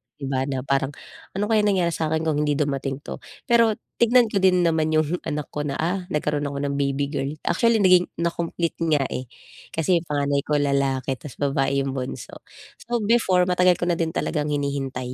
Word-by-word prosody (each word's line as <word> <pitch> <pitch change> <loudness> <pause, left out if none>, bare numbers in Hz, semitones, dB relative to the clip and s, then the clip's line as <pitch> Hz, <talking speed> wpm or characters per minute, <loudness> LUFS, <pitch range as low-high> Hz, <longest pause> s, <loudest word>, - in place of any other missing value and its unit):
Di 145 - -13
ba 130 -1 +1
na 135 -2 -3
parang 135 0 0 0.4
ano 200 - 0
kayang 210 -1 +3
nangyari 175 -2 +1
sa 160 - -1
akin 160 0 0
kung 155 -2 +1
hindi 150 -1 +1
dumating 140 -2 -2
'to? - - -7 0.3
Pero 230 -2 +4 0.2
tignan 240 0 +5
ko 200 - +1
din 185 -1 +4
naman 160 -2 +2
yung 155 +3 +1
anak 150 -1 -3
ko 150 - -3
na, 140 - -3
ah, 180 +3 -2
nagkaroon 150 -2 -1
ako 140 - -5
ng 140 0 -2
baby 140 0 0
girl, 135 -1 -2 0.2
actually 230 -1 +3
naging 180 -1 +5
na-complete 170 0 -1
nga, 150 -3 +3
eh. 130 - -4 0.5
Kasi 170 +2 +2
yung 165 - -14
panganay 145 -1 +1
ko 150 - +1
lalaki 140 -2 0
ta's 145 - -10
babae 140 -1 +1
yung 135 - -2
bunso. 130 -1 -6 0.4
So, 240 0 -2
before, 205 -5 +3
matagal 180 0 +4
ko - - -3
na 175 - +2
din 165 -1 -1
talagang 150 -2 -1
hinihintay 135 -3 -2
150 Hz, 200 wpm, -23 LUFS, 140-180 Hz, 0.5 s, tignan